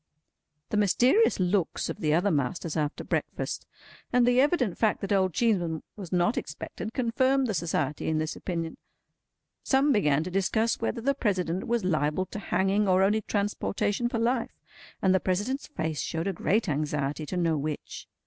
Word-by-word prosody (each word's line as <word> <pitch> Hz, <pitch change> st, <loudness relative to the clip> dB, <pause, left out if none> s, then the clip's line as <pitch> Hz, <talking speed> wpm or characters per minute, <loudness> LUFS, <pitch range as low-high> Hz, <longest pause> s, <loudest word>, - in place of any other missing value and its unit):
The 210 Hz, -, +1 dB
mysterious 245 Hz, -, +4 dB
looks 185 Hz, -1 st, 0 dB
of -, -, -5 dB
the 150 Hz, -, +1 dB
other 180 Hz, +6 st, +3 dB
masters 150 Hz, +2 st, -1 dB
after 150 Hz, -1 st, -2 dB
breakfast, -, -, -3 dB, 0.4 s
and 245 Hz, -1 st, +4 dB
the 245 Hz, +1 st, +4 dB
evident 275 Hz, -, +1 dB
fact 220 Hz, -2 st, +2 dB
that 195 Hz, -, -4 dB
old 190 Hz, -2 st, +3 dB
Cheeseman 175 Hz, -9 st, +1 dB
was 190 Hz, -5 st, -8 dB
not 180 Hz, +5 st, +2 dB
expected, 180 Hz, +7 st, -7 dB
confirmed 260 Hz, +2 st, +2 dB
the 220 Hz, -, -1 dB
Society 155 Hz, -4 st, -1 dB
in 160 Hz, -, +1 dB
this 155 Hz, 0 st, -2 dB
opinion. 165 Hz, -3 st, -4 dB, 0.8 s
Some 275 Hz, +2 st, +3 dB
began 150 Hz, -, +3 dB
to 180 Hz, -, -6 dB
discuss 220 Hz, +4 st, +1 dB
whether 230 Hz, +1 st, -1 dB
the 275 Hz, +4 st, +2 dB
President 185 Hz, -8 st, -1 dB
was 235 Hz, -4 st, 0 dB
liable 155 Hz, +1 st, +1 dB
to 210 Hz, -, -7 dB
hanging 195 Hz, +2 st, +1 dB
or 185 Hz, 0 st, +4 dB
only 210 Hz, +3 st, +2 dB
transportation 205 Hz, +2 st, -1 dB
for 235 Hz, -, -2 dB
life, 235 Hz, +1 st, 0 dB, 0.5 s
and 190 Hz, -1 st, +4 dB
the 190 Hz, -, +4 dB
President's 205 Hz, +11 st, -1 dB
face 160 Hz, -, -3 dB
showed 165 Hz, 0 st, -3 dB
a 195 Hz, -, 0 dB
great 210 Hz, +5 st, +1 dB
anxiety 150 Hz, 0 st, -2 dB
to 185 Hz, -, -3 dB
know 165 Hz, -2 st, +2 dB
which. 150 Hz, 0 st, -5 dB
190 Hz, 170 wpm, -28 LUFS, 165-230 Hz, 0.8 s, mysterious